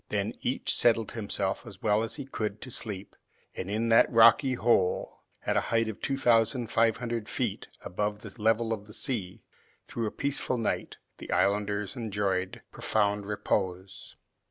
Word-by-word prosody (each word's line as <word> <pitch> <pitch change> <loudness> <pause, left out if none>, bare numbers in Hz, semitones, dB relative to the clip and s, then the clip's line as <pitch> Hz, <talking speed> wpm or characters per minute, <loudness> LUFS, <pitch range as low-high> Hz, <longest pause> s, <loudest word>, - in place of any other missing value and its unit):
Then - - -1
each - - -1
settled 115 -2 +3
himself 100 -3 -2
as 100 -1 -11
well 105 0 +3
as 115 - -3
he 140 - -6
could 110 -5 -3
to 130 - -7
sleep, 105 -4 -5 0.4
and 95 - -5
in 110 +3 0
that 115 - +6
rocky 115 +3 +6
hole, 110 -6 +1 0.3
at - - +1
a - - +4
height 115 -1 +2
of 110 - -6
two 135 - -1
thousand 120 -1 +2
five 115 -1 +3
hundred 115 -2 -3
feet - - -2 0.2
above 105 +3 -2
the 105 -3 -10
level 115 +1 +2
of 105 -1 -6
the 105 - -11
sea, 105 -10 -4 0.4
through 115 -2 -2
a - - -3
peaceful 140 -2 -1
night, 115 - -2 0.2
the - - -7
islanders 100 0 +1
enjoyed 100 -5 -2
profound 105 -1 0
repose. 95 -2 -2
110 Hz, 165 wpm, -29 LUFS, 100-115 Hz, 0.4 s, that